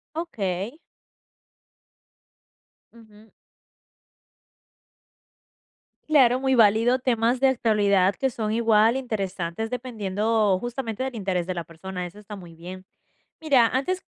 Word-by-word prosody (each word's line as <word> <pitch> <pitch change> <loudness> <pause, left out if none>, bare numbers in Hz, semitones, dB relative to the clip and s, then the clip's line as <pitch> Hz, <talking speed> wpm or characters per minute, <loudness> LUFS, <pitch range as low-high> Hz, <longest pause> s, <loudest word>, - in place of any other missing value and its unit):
Okey. 220 - -4 2.2
Ujú. 220 -1 -18 2.8
Claro, 255 -5 +5
muy 265 0 +1
válido. 230 +2 +4
Temas 245 -1 0
de 270 +1 +4
actualidad 205 -6 +2
que 265 -1 -1
son 220 -2 -3
igual, 225 0 +3
interesantes, 200 -5 -4
dependiendo, 215 -4 0
justamente, 240 0 -4
del 265 -1 -4
interés 190 -5 -2
de 185 - -3
la 170 -1 -4
persona, 180 +2 -7
eso 175 - -15
está 210 0 -10
muy 175 -4 -12
bien. 180 +3 -10 0.6
Mira, 275 -7 +4
antes 320 +11 -2
220 Hz, 105 wpm, -24 LUFS, 195-250 Hz, 2.8 s, Claro